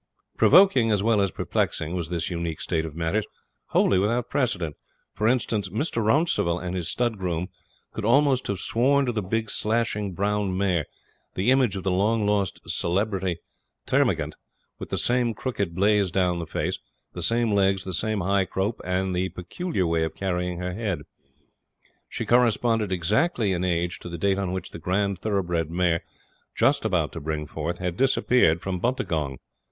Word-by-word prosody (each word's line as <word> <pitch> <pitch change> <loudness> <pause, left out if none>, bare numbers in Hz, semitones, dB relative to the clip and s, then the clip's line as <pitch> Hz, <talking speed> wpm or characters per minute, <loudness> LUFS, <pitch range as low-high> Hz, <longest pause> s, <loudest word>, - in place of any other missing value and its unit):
Provoking, 185 -13 +6
as 105 -2 +2
well 110 -2 +3
as 100 - +2
perplexing, 80 -1 -2
was 85 -3 -3
this 85 0 -2
unique 85 -2 -3
state 80 -2 -1
of 80 -2 -7
matters 85 +6 -1 0.4
wholly 95 - +3
without 115 +5 0
precedent. 90 - 0 0.4
For 105 - 0
instance, 110 -5 0
Mr. 115 - -1
Rouncival 110 - +2
and 90 0 -4
his 85 -3 -2
stud 120 -4 -1
groom 90 -1 -2 0.4
could 110 - -5
almost 130 +2 +3
have 100 - -1
sworn 135 +4 +2
to 125 - 0
the 110 -2 -2
big 110 +3 -2
slashing 105 -3 -1
brown 100 0 0
mare, 90 -6 +1 0.5
the 100 +7 +2
image 130 -6 +3
of 95 - -4
the 95 - 0
long 105 +4 +2
lost 100 -2 0
celebrity 95 -1 -1 0.5
Termagant, - - +1 0.5
with - - -7
the - - -2
same 120 -2 +1
crooked 100 -7 -3
blaze 100 0 +3
down 90 -1 +1
the 85 - -5
face, - - -2 0.3
the 90 - -6
same 115 +6 +1
legs, 95 -1 +2
the 95 - -5
same 110 +3 -1
high 95 +1 +2
croup 95 +5 -2
and 95 0 -1 0.2
peculiar 95 - -2
way 85 -1 +1
of 80 - -3
carrying 90 -2 -2
her 90 +1 -3
head. 100 -3 -2 1.1
She - - -4
corresponded 115 -3 +2
exactly 105 - +1
in 90 0 -1
age 85 -1 -1
to - - -8
the 85 - -5
date 95 +3 +1
on 95 -2 -1
which 95 0 -4
the - - -8
grand 95 +3 0
thoroughbred 90 -6 -1
mare, 85 -1 +1 0.5
just 140 -2 +2
about 90 -8 +1
to 85 - -6
bring 75 0 -3
forth, 80 +3 -4
had 90 -1 -3
disappeared 125 -10 +3
from 95 -2 -3
Buntagong. 85 - -1
95 Hz, 170 wpm, -25 LUFS, 90-110 Hz, 1.1 s, Provoking